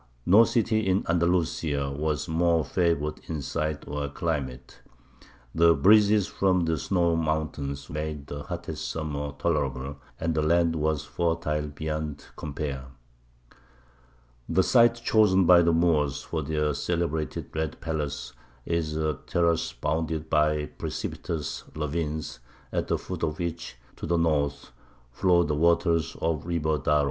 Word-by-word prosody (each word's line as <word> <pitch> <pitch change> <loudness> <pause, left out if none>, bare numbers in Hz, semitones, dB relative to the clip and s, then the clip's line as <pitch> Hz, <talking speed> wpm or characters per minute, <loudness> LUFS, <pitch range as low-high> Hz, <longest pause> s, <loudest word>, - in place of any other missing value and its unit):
No 105 +6 +7
city 110 -2 +1
in 95 +1 +2
Andalusia 85 -4 +1
was 75 0 -2
more 85 -1 +2
favoured 85 -4 0
in 80 -2 -3
site 75 +1 -3
or 70 0 -3
climate; 70 -5 -4 0.7
the 85 0 +5
breezes 105 +5 +5
from 95 -3 +1
the 80 -2 0
snow 85 0 +1
mountains 75 -3 -2
made 75 -1 -4
the 70 0 -6
hottest - - -5
summer 75 -2 -3
tolerable, 70 -4 -1 0.2
and 80 0 0
the 80 - +1
land 85 +1 +2
was 75 -1 0
fertile 80 -3 -1
beyond 75 0 -4
compare. 70 -3 -4 1.6
The 95 +3 +3
site 120 +1 +5
chosen 105 -5 +3
by 90 0 +7
the 85 0 +3
Moors 80 -5 +2
for 80 - -3
their 75 0 0
celebrated 80 +1 -2
Red 80 -1 -2
Palace 75 -6 -4 0.3
is 80 -2 -1
a 75 -1 -1
terrace 85 -1 +1
bounded 80 0 -2
by 75 0 +2
precipitous 75 0 -5
ravines, 75 -2 -3 0.3
at - - -1
the - - +1
foot - - -7
of 75 0 -1
which, 85 -6 -4 0.2
to - - -5
the 85 +1 +2
north, 70 -3 0 0.4
flow 85 +6 +3
the 75 - -1
waters 85 +1 +2
of 80 -3 0
the - - -13
river 80 -3 0
Darro. 75 +2 +2
80 Hz, 135 wpm, -27 LUFS, 75-85 Hz, 1.6 s, No